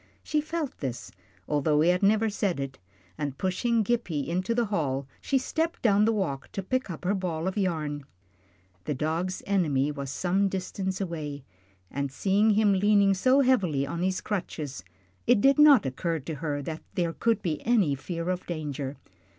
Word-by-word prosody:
She 305 -1 0
felt 310 -2 -4
this, 125 -8 -5 0.4
although 150 0 +2
he 165 - +4
had 180 0 +2
never 215 +2 +4
said 200 -6 -1
it, 135 0 -5 0.4
and 140 -2 -3
pushing 220 +5 +1
Gippie 190 -10 -1
into 185 +6 -1
the 240 -1 +2
hall, 140 -10 -1
she 275 - +1
stepped 320 +5 -2
down 210 -2 +4
the 225 - +3
walk 165 -11 -2
to 195 - -3
pick 255 +4 -1
up 170 0 -7
her 190 - +2
ball 180 -3 -2
of 190 - -2
yarn. 155 -8 -1 0.8
The 150 - -1
dog's 165 +6 -2
enemy 150 -8 +1
was 140 -2 -5
some 190 +7 +1
distance 190 0 -3
away, 150 -6 -4 0.5
and 140 0 -2
seeing 200 +8 +2
him 210 -1 +4
leaning 200 0 +4
so 255 +8 +4
heavily 185 - +2
on 170 +5 -4
his 185 +1 0
crutches, 155 - -4 0.4
it - - +5
did 275 +6 +4
not 290 - +7
occur 165 +6 -1
to 155 +2 -6
her 145 -1 -3
that 160 +3 -5
there 170 -2 0
could 225 +1 0
be 160 -5 -2
any 210 -11 +3
fear 170 +5 -3
of 180 0 -4
danger. 145 -4 -4
180 Hz, 175 wpm, -27 LUFS, 150-205 Hz, 0.8 s, not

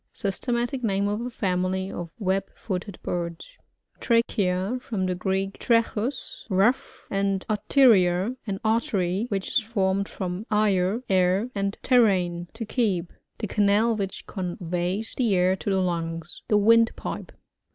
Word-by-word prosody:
Systematic 240 +5 -1
name 200 -2 +1
of 210 +2 -1
a 245 - -3
&mily 190 -3 -1
of 175 -1 -5
web.fboted 195 -1 -3
birds. 170 - -4 0.4
Trachea. 210 -2 +1
— - - -28
From 215 -7 -2
the 185 - 0
Greek, 190 +2 -2
fracAus, 230 +2 0
rough, 200 +6 +1
and 195 -1 0
arteria^ 210 -3 +3
an 195 -1 -2
artery, 220 - +1
which 195 -2 -2
is - - +3
formed 200 -3 0
from 185 +2 -5
o«r, 210 +1 +2
air, 190 +5 +2
and 200 0 -2
tertin^ 185 -8 +2
to 225 0 -6
keep. 200 -7 -1 0.2
The 220 - -3
canal 210 +3 +2
which 195 -2 -4
conveys 180 +2 -2
\ - - -13
the 230 -6 +2
air 180 +1 +3
to 200 - -4
the 190 -1 +2
lungs. 165 -2 -3
The 210 - +3
windpipe. 230 +2 +2
195 Hz, 140 wpm, -25 LUFS, 185-225 Hz, 0.4 s, arteria^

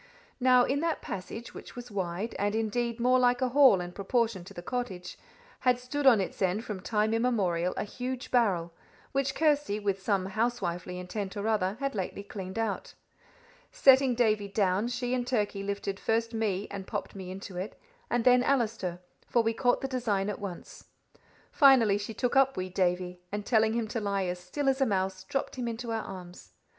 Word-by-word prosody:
Now, 250 -1 +6
in 275 +3 0
that 330 +1 -1
passage, 210 +5 -6
which - - -10
was 245 -1 -8
wide, 190 +2 -3
and 205 +1 0
indeed 230 +2 -1
more 250 +2 +4
like 245 0 +3
a 255 - +1
hall 260 -6 +6
in 175 0 -5
proportion 215 0 0
to - - -11
the 175 - -7
cottage, 195 -7 -4 0.4
had 250 -1 +3
stood 270 +3 -1
on 235 -5 +7
its 190 - -4
end 190 +5 +1
from 210 -3 -4
time 215 +2 +1
immemorial 195 -7 +1
a - - 0
huge 250 +4 -5
barrel, 185 -9 +2 0.4
which 270 0 0
Kirsty, 295 -9 +2
with 200 -2 -1
some 195 -2 +1
housewifely 190 -5 -2
intent 190 +3 -5
or 205 +2 -2
other, 205 -2 +1
had 275 0 -1
lately 200 0 -4
cleaned 190 -1 -7
out. 225 -3 -2 0.8
Setting 265 -2 +5
Davie 215 -4 +2
down, 195 +1 +1
she 245 0 -2
and 245 -1 -1
Turkey 210 -5 0
lifted 200 0 -3
first 230 +1 0
me 210 -3 -1
and 195 -1 -6
popped - - -4
me 190 -2 -7
into 190 0 -8
it, 190 +4 -5 0.3
and 240 - +1
then 250 0 +6
Allister, 220 -9 0 0.3
for 235 - +2
we 225 0 +1
caught 245 +2 +2
the 270 - -1
design 215 -6 0
at - - -7
once. 190 -4 -8 0.7
Finally 245 -8 +6
she 210 +2 -6
took 250 +1 -1
up 270 0 +4
wee 185 0 -2
Davie, 180 -1 -1
and 205 0 -3
telling 220 -1 +3
him 230 -1 -1
to 230 - -2
lie 200 -2 -1
as 180 0 -3
still 270 +11 -4
as 270 0 +2
a - - +5
mouse, 190 -2 -1
dropped 270 +4 -3
him 245 -2 -2
into 230 0 -4
our 225 -1 -1
arms. 180 -2 -10
215 Hz, 195 wpm, -29 LUFS, 190-245 Hz, 0.8 s, on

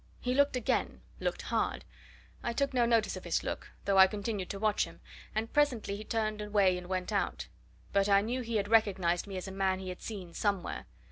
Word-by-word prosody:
He 250 - -1
looked 285 0 +3
again 250 - 0 0.2
looked - - -2
hard. - - -1 0.6
I 235 - -2
took 275 +2 0
no 240 -2 +3
notice 230 -2 +2
of - - -7
his - - 0
look, - - -4 0.2
though 195 -1 +4
I 190 - +10
continued 205 -1 -3
to 200 - -4
watch 210 0 +2
him, - - -13 0.4
and 220 +1 -2
presently 255 -9 +2
he 210 - -6
turned 215 -1 -1
away 205 -3 +3
and 180 0 -6
went 185 -1 -2
out. - - -1 0.5
But 200 0 +3
I 200 0 +6
knew 245 +5 -2
he 230 -1 -4
had 205 -1 +1
recognized 195 -5 +2
me 195 -2 -5
as 185 - -5
a - - -5
man 190 -1 +1
he 190 0 -6
had 180 - -7
seen 190 -6 -7
somewhere. 200 - -1
205 Hz, 215 wpm, -31 LUFS, 190-225 Hz, 0.6 s, I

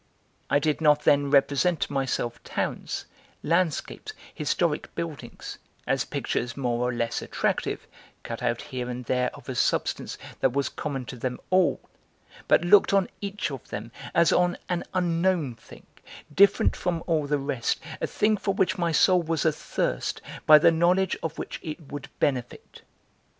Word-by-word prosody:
I 140 - +4
did 150 +2 0
not 150 -1 +4
then 145 -1 +4
represent 145 +4 +3
to - - -2
myself 130 -3 -2
towns, - - -3 0.4
landscapes, 175 - -1 0.2
historic 155 0 -1
buildings, 165 -4 -6 0.3
as - - 0
pictures 120 +1 -3
more 125 -2 0
or - - 0
less 115 -1 -2
attractive, - - -2 0.4
cut 115 - -6
out 120 -1 0
here 125 -3 -5
and 125 0 -5
there 125 +1 +1
of - - -14
a - - -3
substance - - 0 0.2
that 130 -2 +2
was 140 0 0
common 135 -4 -4
to 125 - -8
them 125 +1 -3
all, 185 -1 +3 0.7
but - - +4
looked 200 +2 +6
on 195 -2 +2
each 200 -5 -3
of 135 -3 -8
them 105 +3 -6 0.2
as 170 0 +5
on 180 0 +2
an 175 -1 -1
unknown 170 -5 +1
thing, 115 - -16 0.5
different 200 +4 +5
from 175 -2 -2
all 155 -4 0
the 145 0 +1
rest, 135 -4 -1 0.2
a - - 0
thing 215 0 +1
for 195 0 -1
which 190 -2 +1
my 170 -1 +1
soul 180 +3 +4
was 165 -2 -1
athirst, 145 - -1 0.3
by 155 - +10
the 155 - +5
knowledge 175 +3 +2
of 165 -1 -4
which - - -5
it 155 +1 -6
would 140 -1 -6
benefit. 125 -4 -2
150 Hz, 160 wpm, -26 LUFS, 130-175 Hz, 0.7 s, by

